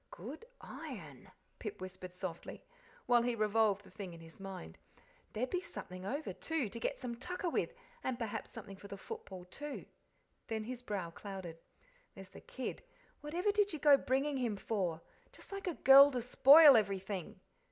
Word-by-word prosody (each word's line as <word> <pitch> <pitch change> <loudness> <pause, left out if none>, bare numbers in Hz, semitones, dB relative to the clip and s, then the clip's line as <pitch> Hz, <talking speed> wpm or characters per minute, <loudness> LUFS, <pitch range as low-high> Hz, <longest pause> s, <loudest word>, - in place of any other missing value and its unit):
"Good 270 - -9
iron," - - -9 0.3
Pip - - -6
whispered 185 -1 -8
softly, 180 -2 -7 0.4
while 240 -1 +5
he 240 0 0
revolved 215 -2 +2
the - - -16
thing 190 -5 -7
in - - -12
his 165 +2 -14
mind. 190 - -8 0.5
"There'd 250 +4 -2
be 360 - 0
something 185 - -7
over, 285 +7 -3
too, 320 -9 -2
to 230 - -6
get - - -2
some 245 -3 -4
tucker 360 +6 -3
with, - - -1 0.3
and 255 -2 -1
perhaps 230 -4 -4
something 195 -4 -9
for 200 - -11
the 200 - -7
football, 185 -1 -8
too." 290 +10 -7 0.6
Then 220 -1 -2
his 245 +2 -6
brow 195 -8 -4
clouded. 185 -3 -8 0.6
"There's 195 -1 -10
the - - -12
kid 260 - -5 0.4
whatever 345 +7 0
did 410 -2 +2
you - - -2
go 290 -1 +7
bringing 275 +2 0
him 235 -5 -1
for? 185 -6 -2 0.3
Just - - -14
like 395 -1 -5
a 350 - -1
girl 275 +2 +9
to 250 - -1
spoil 275 +4 +9
everything!" 195 -4 -1
225 Hz, 175 wpm, -35 LUFS, 195-280 Hz, 0.6 s, girl